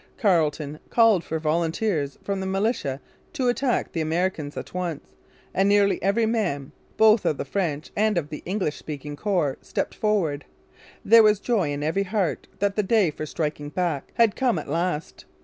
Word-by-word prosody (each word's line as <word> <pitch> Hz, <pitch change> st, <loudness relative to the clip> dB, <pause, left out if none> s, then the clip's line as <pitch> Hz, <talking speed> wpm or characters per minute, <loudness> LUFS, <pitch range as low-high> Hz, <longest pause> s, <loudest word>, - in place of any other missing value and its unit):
Carleton 155 Hz, -, +1 dB
called 225 Hz, -7 st, +4 dB
for 160 Hz, -, -3 dB
volunteers 160 Hz, -1 st, -1 dB
from 200 Hz, -1 st, -2 dB
the 190 Hz, -, -3 dB
militia 190 Hz, -, -1 dB, 0.3 s
to 255 Hz, -2 st, +1 dB
attack 245 Hz, 0 st, 0 dB
the 165 Hz, -, -2 dB
Americans 160 Hz, -2 st, -1 dB
at -, -, -7 dB
once; 175 Hz, -5 st, -4 dB, 0.4 s
and 195 Hz, +1 st, +2 dB
nearly 200 Hz, -1 st, +3 dB
every 200 Hz, +4 st, +2 dB
man, 185 Hz, -, -1 dB, 0.3 s
both 220 Hz, 0 st, +5 dB
of 150 Hz, -, 0 dB
the -, -, -4 dB
French 155 Hz, -2 st, -2 dB
and 215 Hz, -2 st, +2 dB
of 150 Hz, -4 st, -1 dB
the 150 Hz, -, -7 dB
English 185 Hz, -5 st, -2 dB
speaking 145 Hz, -1 st, -7 dB
corps, 175 Hz, -6 st, 0 dB
stepped -, -, -3 dB
forward. 175 Hz, -10 st, 0 dB, 0.6 s
There 230 Hz, +2 st, +8 dB
was 210 Hz, -2 st, +4 dB
joy 205 Hz, -9 st, 0 dB
in 145 Hz, 0 st, -3 dB
every 160 Hz, +6 st, 0 dB
heart 195 Hz, -3 st, -1 dB
that 200 Hz, +1 st, 0 dB
the 210 Hz, -, +2 dB
day 205 Hz, -4 st, +2 dB
for 155 Hz, +1 st, -6 dB
striking 150 Hz, -2 st, -3 dB
back 165 Hz, -4 st, -2 dB
had 230 Hz, -3 st, +4 dB
come 250 Hz, -8 st, +1 dB
at 155 Hz, -, -5 dB
last. 165 Hz, +1 st, -2 dB
180 Hz, 175 wpm, -24 LUFS, 150-210 Hz, 0.6 s, There